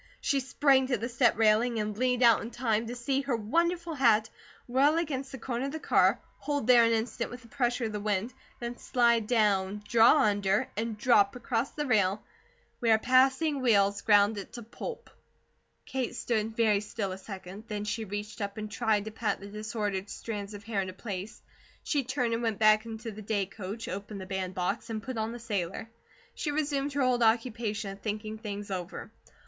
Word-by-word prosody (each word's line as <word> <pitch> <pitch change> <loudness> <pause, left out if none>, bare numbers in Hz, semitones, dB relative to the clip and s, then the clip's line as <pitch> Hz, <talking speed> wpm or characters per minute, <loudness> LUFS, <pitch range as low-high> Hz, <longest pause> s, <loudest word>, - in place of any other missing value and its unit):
She 280 - +1
sprang 265 0 +3
to 255 -2 +1
the 225 +3 -3
step 240 -2 +2
railing 225 +2 +3
and 210 0 -2
leaned 250 +2 +1
out 230 -2 +6
in 230 - -5
time 230 -2 -1
to 240 - -5
see 265 +3 0
her 275 -3 -1
wonderful 335 +10 0
hat 225 -6 +3 0.4
whirl 275 +5 +3
against 275 -5 -2
the 265 - -6
corner 245 +2 -3
of - - -4
the 315 - -5
car, - - +3 0.2
hold 290 -4 -2
there 240 -1 +7
an 230 - +3
instant 225 0 -1
with 245 0 -9
the - - -15
pressure 240 0 0
of 220 - -3
the 210 - -3
wind, 210 +3 -1 0.3
then 240 0 -5
slide 235 -3 +2
down, 210 -3 +1
draw 230 0 +6
under, 205 +3 +2
and 220 0 -3
drop 210 -3 +4
across 245 0 -1
the 295 - -4
rail, 205 -5 +2 0.6
where 225 -2 +4
passing 265 +5 +3
wheels 200 -4 +3
ground 205 0 +4
it 195 - -10
to 240 - -7
pulp. 470 - -8 0.7
Kate 255 -2 -3
stood 225 -2 -2
very 215 -3 +3
still 205 -1 -4
a 185 - -5
second, 195 +1 -9
then 210 -1 -4
she 215 +2 -2
reached 205 +2 -6
up 200 +1 -4
and 215 0 -5
tried 215 -2 +1
to 220 - -5
pat 220 0 -2
the 195 - -10
disordered 210 -1 -3
strands 210 -2 -6
of 205 - -10
hair 210 -2 -1
into 185 -1 -5
place. 195 0 -7 0.4
She 285 -3 0
turned 250 -2 -1
and 230 - -1
went 225 -3 -1
back 215 +1 +4
into 225 0 -6
the 215 +1 -9
day 205 -1 -1
coach, 200 +3 -7
opened 200 +2 -6
the 190 - -7
bandbox, 190 +3 -3
and 220 -1 -4
put 255 -2 -4
on 220 +1 -1
the 240 - -6
sailor. 210 -2 -4 0.4
She 300 - -3
resumed 290 -1 -1
her 280 -1 +1
old 250 -1 +2
occupation 225 -3 +1
of 195 - -10
thinking 215 0 -4
things 205 -2 -6
over. 180 -1 -5
225 Hz, 195 wpm, -29 LUFS, 205-250 Hz, 0.7 s, there